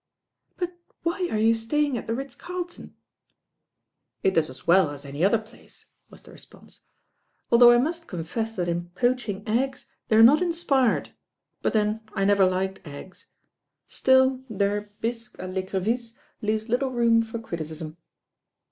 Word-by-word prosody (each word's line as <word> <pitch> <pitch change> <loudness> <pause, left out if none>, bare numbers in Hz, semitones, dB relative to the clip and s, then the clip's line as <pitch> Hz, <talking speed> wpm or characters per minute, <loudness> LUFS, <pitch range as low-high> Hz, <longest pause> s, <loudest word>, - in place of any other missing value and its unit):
"But 360 -1 -3 0.3
why 350 +2 -1
are 215 - 0
you 225 +1 +4
staying 265 +5 0
at 235 - -5
the 225 - -1
Ritz 270 0 -6
Carlton 355 +4 -7 0.6
?" - - -55
"It 190 - +3
does 160 -4 +2
as 130 - -11
well 175 -1 +5
as 145 -1 -9
any 140 +4 -4
other 205 +4 +4
place," 220 +2 -15 0.2
was - - -16
the - - -15
re - - -14
sponse, - - -16 0.7
"although 240 0 +8
I 240 - +6
must 330 +6 -1
confess 215 +6 -4
that 180 -2 -2
in 175 0 -2
poaching 240 -5 -1
eggs 260 +4 -1 0.2
they 220 - +2
are 225 - +8
not 285 +8 +7
inspired, 330 -8 +1 0.5
but - - 0
then 215 0 +1
I 195 - +1
never 200 -1 +5
liked 190 +1 -1
eggs; 145 +6 -11 0.6
still, 260 0 +3
their 205 0 -1
bisque 230 -1 -4
a - - -7
I'ecrevisse 190 +5 -2 0.3
leaves 215 +1 -1
little 250 +3 0
room 235 -2 +3
for 225 +1 -5
criticism." 160 -6 -6
225 Hz, 160 wpm, -25 LUFS, 190-255 Hz, 0.7 s, although